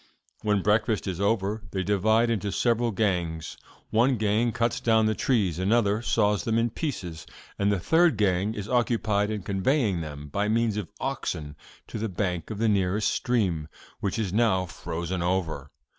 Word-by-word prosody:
When 105 -3 +1
breakfast 110 +1 +1
is 95 -1 -3
over, 105 +1 0
they 95 -1 -2
divide 110 +4 +2
into 105 -3 -1
several 120 +1 +1
gangs. 90 -7 -1 0.4
One 120 +3 +3
gang 110 +2 +1
cuts 115 +1 0
down 110 -1 +3
the 110 - +2
trees, 100 - 0
another 105 +2 +2
saws 105 -3 +1
them 115 -1 0
in 115 0 +1
pieces, 90 - -5 0.3
and 100 +1 +2
the 100 - +1
third 165 - +3
gang 100 +1 +1
is 105 -1 -5
occupied 115 -4 +1
in 105 -3 -3
conveying 100 - +1
them, 75 -2 -7
by 100 +7 -1
means 110 0 +1
of 105 -5 -4
oxen, 75 -1 -3 0.3
to 110 - -6
the 110 +1 -2
bank 90 -3 -2
of 110 - -5
the 115 +2 +1
nearest 100 +1 +2
stream, 95 -13 0 0.3
which 100 - -2
is 105 -5 -2
now 105 -5 +2
frozen 85 +1 -4
over. 85 -6 -1
105 Hz, 170 wpm, -26 LUFS, 90-115 Hz, 0.4 s, One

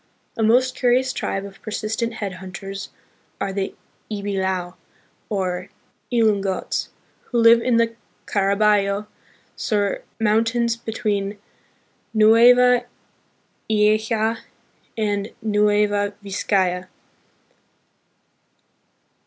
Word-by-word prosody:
A - - -3
most 250 +4 +3
curious 255 +1 +2
tribe 195 0 -3
of 195 -1 -12
persistent 220 +2 -3
headhunters 195 -1 -6 0.5
are 195 -1 -2
the 195 -1 -3 0.3
Ibilao, 190 -4 -2 0.6
or 185 -2 -2 0.4
Ilungots, 205 -5 0 0.4
who 240 - -3
live 230 0 +6
in 240 -1 +2
the 230 0 +1 0.3
Caraballo 200 0 +2 0.5
Sur 205 -3 -1 0.2
Mountains 230 +2 +2
between 210 -3 -2 0.8
Nueva 240 +3 +6 0.8
Ecija 220 +1 +2 0.6
and 205 -1 -1
Nueva 205 -1 +2
Vizcaya. 185 -2 0
210 Hz, 80 wpm, -22 LUFS, 200-230 Hz, 0.8 s, live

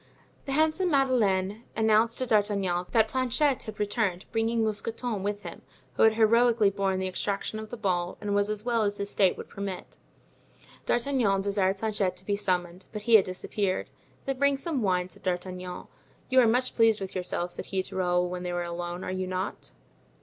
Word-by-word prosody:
The 275 - -3
handsome 315 +5 +2
Madeleine 220 - +1
announced 220 +1 +3
to 255 - -1
D'Artagnan 200 -5 +1
that 225 -2 +3
Planchet 260 +3 +1
had 215 - -7
returned, 205 -3 -1
bringing 225 0 +1
Mousqueton 220 0 -2
with 205 +1 -3
him, - - -8 0.3
who - - -2
had 220 - +6
heroically 225 -1 +4
borne 195 -1 0
the 190 0 -1
extraction 200 +3 -2
of 220 0 -8
the 240 - -6
ball 180 -4 -1
and 205 -1 -2
was 205 0 +2
as 215 +1 -3
well 235 -2 +1
as 205 -1 0
his 200 0 -3
state 190 -3 +3
would - - -8
permit. 195 -2 -6 0.9
D'Artagnan 240 -6 +2
desired 195 -1 +1
Planchet 200 -3 -1
to 185 +1 -9
be 205 - 0
summoned, 180 -2 -2
but 210 -1 -6
he 235 - +1
had 215 -3 +8
disappeared. 185 +1 -2 0.3
"Then 270 -1 -2
bring 280 0 +3
some 275 -1 -2
wine," 180 -3 +1
said 185 - -14
D'Artagnan. 180 0 -4 0.4
"You 260 0 +5
are 245 - +6
much 250 +3 +1
pleased 225 -2 +4
with 195 -1 -6
yourself," 180 -1 -2
said - - -6
he 190 -1 -1
to - - -9
Raoul 180 -1 +1
when 180 0 -5
they 180 0 -3
were 175 0 -1
alone, 175 +1 -5
"are - - -3
you 185 0 -2
not?" 185 +1 -4
205 Hz, 195 wpm, -28 LUFS, 185-230 Hz, 0.9 s, had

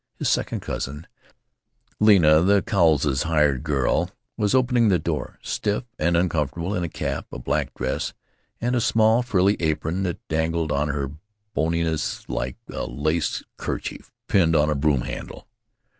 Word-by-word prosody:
His - - 0
second - - 0
cousin, 75 +5 -5 0.9
Lena, 85 -8 +6
the 100 +3 +4
Cowleses' 75 - +2
"hired 75 -5 +2
girl," 70 -4 +1 0.3
was 105 +2 +1
opening 125 -3 +3
the 95 - +4
door, - - -3
stiff 105 +4 -1 0.2
and 85 -1 +2
uncomfortable 85 +1 0
in 90 - -1
a 85 - -2
cap, - - -4
a - - -6
black - - -1
dress, 65 +1 -2 0.4
and 120 +2 0
a 120 - +2
small 110 +1 +4
frilly 100 -4 +2
apron 80 +2 -1
that 90 -3 -4
dangled 80 0 0
on 75 +1 +1
her 70 -2 -2 0.4
boniness 80 -1 -1
like 65 +1 -3
a - - -4
lace 75 +6 -1
kerchief - - -5 0.2
pinned 85 -4 +3
on 75 0 +3
a - - +1
broom 70 -2 +2
handle. - - -7
80 Hz, 150 wpm, -24 LUFS, 75-100 Hz, 0.9 s, Lena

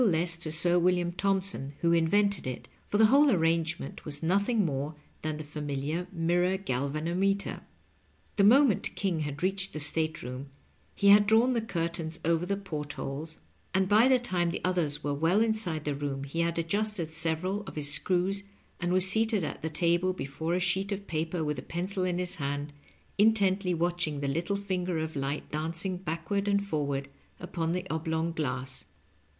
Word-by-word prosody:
less 170 -5 +2
to 165 -1 -5
Sir 175 +2 +3
William 175 0 +2
Thompson, 190 -6 0
who 170 - +3
invented 195 +3 +2
it, 130 - -5 0.2
for 205 - 0
the 220 - +7
whole 280 +6 +6
arrangement 165 - 0
was 145 0 -4
nothing 200 +5 +2
more 145 0 -2 0.3
than 155 -1 -3
the 155 - -6
familiar 150 +3 -3
mirror 175 +2 +1
galvanometer. 170 +6 -1 0.7
The 200 - +3
moment 245 0 +4
King 185 -5 -1
had 150 +1 -4
reached 195 +1 0
the 155 - -4
state 155 +1 0
room 130 +2 -6 0.5
he 200 - +3
had 205 0 +7
drawn 230 +4 +4
the 235 - 0
curtains 170 -5 -3
over 165 +1 +1
the 200 +1 0
port 150 -7 -5
holes, 155 +4 -5 0.3
and 190 0 +3
by 215 +5 +5
the 260 -1 +5
time 180 -8 0
the 170 - -4
others 160 -5 0
were 145 - -1
well 165 +7 +2
inside 215 -9 +2
the 150 - 0
room 140 -1 -3
he 140 +4 -5
had 170 0 0
adjusted 190 +1 0
several 165 +5 -1
of - - -8
his 145 -1 +1
screws, 185 +5 +1 0.4
and 175 0 -1
was 185 0 +4
seated 220 -1 +2
at - - -5
the 160 - -2
table 170 +3 +1
before 160 +1 -3
a - - +1
sheet 190 +2 0
of 200 0 -3
paper 160 0 -2
with 150 -1 -2
a - - -5
pencil 185 +3 -3
in 180 -1 0
his 180 -1 -1
hand, 145 0 -3 0.5
intently 200 -4 +3
watching 170 -3 -1
the 140 - -2
little 170 +8 -1
finger 185 -3 -2
of 160 0 -3
light 140 +1 -3
dancing 165 +4 -1
backward 185 +4 -3
and 200 0 +2
forward 140 -6 -2 0.3
upon 170 -2 -2
the 180 +1 -3
oblong 160 +1 -1
glass. 135 -5 -2
170 Hz, 180 wpm, -29 LUFS, 155-195 Hz, 0.7 s, the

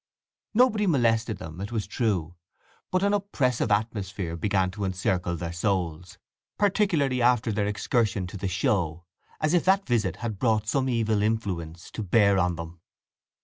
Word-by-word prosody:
Nobody 220 -4 +4
molested 115 - +2
them, 80 +3 -8
it 100 - -5
is 110 -3 -2
true; 95 - -1 0.6
but 185 +1 +1
an 200 0 +2
oppressive 140 - 0
atmosphere 100 -5 -1
began 95 +1 0
to 100 +1 -6
encircle 90 -2 -1
their 85 0 -5
souls, 90 -2 -2 0.4
particularly 180 -11 +2
after 120 -2 +3
their 105 -1 0
excursion 105 -1 0
to 90 - -9
the 95 - -3
show, 85 -3 0 0.3
as 155 +1 +1
if 175 - +3
that 195 +1 +3
visit 110 -7 0
had 110 -5 -5
brought 110 -3 +2
some 130 +4 0
evil 110 -3 +1
influence 95 -7 -2
to - - -5
bear 100 0 +3
on 90 -1 +1
them. 85 0 -8
105 Hz, 155 wpm, -26 LUFS, 90-125 Hz, 0.6 s, Nobody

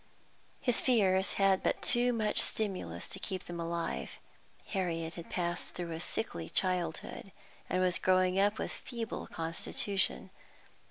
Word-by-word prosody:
His 245 -3 +3
fears 195 -6 +4
had 195 -1 +4
but - - 0
too 245 +1 +4
much 215 -3 +2
stimulus 185 - -1
to - - -3
keep 185 -1 -3
them 175 -1 -6
alive. 170 0 -2 0.6
Harriet 165 -4 -1
had 170 -1 -8
passed 175 -1 -2
through 175 -2 -4
a 160 - -3
sickly 85 - -2
childhood, 180 +1 -1 0.4
and 185 0 +2
was 180 -1 +2
growing 185 0 +3
up 205 +2 +3
with - - -2
a - - -6
feeble 230 -3 -4
constitution. 165 +4 -1
185 Hz, 145 wpm, -33 LUFS, 170-200 Hz, 0.6 s, fears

